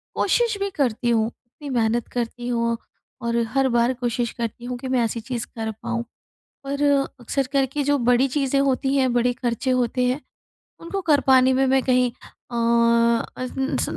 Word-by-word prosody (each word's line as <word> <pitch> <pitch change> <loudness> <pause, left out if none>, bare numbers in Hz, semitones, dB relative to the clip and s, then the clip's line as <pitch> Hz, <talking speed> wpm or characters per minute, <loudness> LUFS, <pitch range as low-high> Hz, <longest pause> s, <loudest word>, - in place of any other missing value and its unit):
कोशिश 470 -3 +1
भी 400 0 -1
करती 255 - -1
हूँ, 225 -2 +2
इतनी 245 +5 -12
मेहनत 235 -2 0
करती 240 0 -3
हूँ 235 -1 0 0.4
और 235 0 -1 0.2
हर 270 -1 +3
बार 240 +1 +2
कोशिश 240 -1 -2
करती 235 +1 -4
हूँ 250 0 -4
कि 260 +2 -7
मैं 255 -1 +1
ऐसी 230 +1 -2
चीज़ 240 0 -4
कर 220 -1 -3
पाऊँ। 235 0 -2 0.6
पर 280 +1 -3 0.4
अक्सर 265 +3 -1
करके 275 +1 +1
जो 290 +1 +2
बड़ी 245 +2 +3
चीज़ें 275 0 +1
होती 270 0 +1
हैं, 260 -2 +2
बड़े 245 0 +2
खर्चे 245 +1 -2
होते 250 0 +1
हैं 255 +4 0 0.6
उनको 390 +4 -4
कर 290 -2 +5
पाने 260 -1 +6
में 265 +1 +2
मैं 265 0 +3
कहीं 250 -1 +3 0.4
अ, 235 +2 +1
250 Hz, 170 wpm, -23 LUFS, 235-270 Hz, 0.6 s, पाने